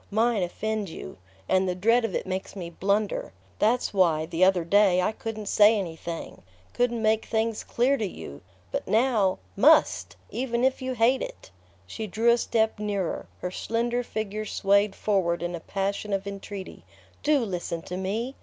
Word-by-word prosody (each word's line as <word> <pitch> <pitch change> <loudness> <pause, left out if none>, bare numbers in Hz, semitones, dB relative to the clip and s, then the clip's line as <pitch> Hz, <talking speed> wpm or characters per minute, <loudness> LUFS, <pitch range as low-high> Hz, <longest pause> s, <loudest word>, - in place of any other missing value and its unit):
Mine 220 0 +2
offend 210 +3 -2
you... 95 - -9 0.3
and 185 0 +2
the 180 - -1
dread 230 +6 +3
of 225 - -2
it - - -2
makes 190 +1 -4
me 175 -3 -6
blunder. 200 +4 -1 0.3
That's 235 +1 +2
why, 165 -5 +3
the 165 +3 0
other 185 -2 +4
day, 190 +1 +4
I 185 - +2
couldn't 220 -1 -6
say 210 +2 +5
anything... 170 -3 -6 0.3
couldn't 240 -2 0
make 220 0 +2
things 225 -1 -1
clear 260 +4 +1
to 215 - -1
you. 75 - -9 0.3
But - - -3
now 220 -5 +2 0.2
MUST, 295 +9 +4 0.2
even 240 -1 -1
if 265 +1 +2
you 260 0 -2
hate 245 +3 +3
it!" - - -8 0.3
She 215 - -6
drew 225 +4 +3
a 235 - +3
step 220 -2 +1
nearer, 200 -4 -2
her 180 - -3
slender 235 +5 -1
figure 215 -2 -4
swayed 200 0 +2
forward 175 -5 0
in 175 0 -2
a 170 - -4
passion 200 +3 -3
of 195 0 -1
entreaty. 200 -1 -7 0.4
"Do 300 0 +3
listen 175 -4 -4
to 180 - -6
me! 210 +7 -2
205 Hz, 175 wpm, -26 LUFS, 185-230 Hz, 0.4 s, say